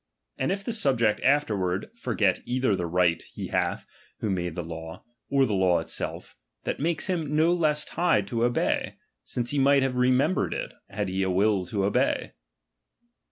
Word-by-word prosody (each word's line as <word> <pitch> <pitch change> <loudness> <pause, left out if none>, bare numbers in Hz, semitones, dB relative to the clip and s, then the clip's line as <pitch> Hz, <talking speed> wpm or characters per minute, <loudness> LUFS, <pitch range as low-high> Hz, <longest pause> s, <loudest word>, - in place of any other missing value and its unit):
And 130 - +1
if 200 +1 -2
the 235 - -3
subject 120 - +1
afterward 105 - +1
forget 105 - 0
either 125 -4 +1
the 90 -2 -2
right 85 -1 +2
he - - -8
hath - - -1 0.3
who 105 - -1
made 90 -3 -2
the 90 - -3
law, 80 0 -8 0.3
T 135 -1 +4
the 110 - -1
law 95 -2 +3
itself, - - -5 0.3
that - - -3
makes 160 +2 -1
him 165 -6 -1
no 160 +3 +4
less 155 -3 +1
tied 140 - +1
to 120 - -3
ol)ey; 120 0 +1 0.3
since 120 -1 -2
he 145 - 0
might 140 0 +5
have 135 -1 -1
remembered 130 +8 +2
it, - - -4 0.2
had 105 0 -2
he 95 +1 -1
a 95 - +1
will 95 0 +2
to 100 +1 -1
obey. 100 - +1
115 Hz, 175 wpm, -26 LUFS, 95-145 Hz, 0.3 s, might